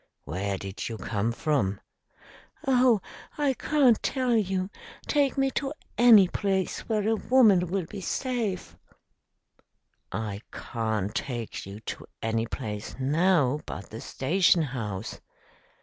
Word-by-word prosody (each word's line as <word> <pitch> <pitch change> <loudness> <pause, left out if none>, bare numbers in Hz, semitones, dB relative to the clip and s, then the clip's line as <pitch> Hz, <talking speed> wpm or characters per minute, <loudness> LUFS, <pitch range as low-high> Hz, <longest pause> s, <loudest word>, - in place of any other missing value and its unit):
"Where 95 +3 -2
did 95 +4 -5
you 115 - -5
come 110 +1 -1
from?" 115 -7 0 0.9
"Oh, 250 -5 +4 0.4
I 290 -3 +2
can't 260 -4 +3
tell 255 -3 +1
you! 190 -2 0 0.3
Take 285 -2 +1
me 270 0 +2
to 270 +4 -2 0.2
any 225 -6 +8
place 190 0 -1
where 215 -2 +1
a 225 - +3
woman 215 -7 +4
will 185 0 -1
be 200 +4 -8
safe." 230 -4 -2 1.4
"I 105 -2 -4
can't 110 -4 -2
take 120 -6 -4
you 100 +2 -9
to - - -7
any 115 0 -1
place 105 -1 -5
now 150 0 +3
but 100 - -7
the 110 - -7
station 170 +4 +2
house." 110 -7 -5
175 Hz, 125 wpm, -27 LUFS, -, 1.4 s, any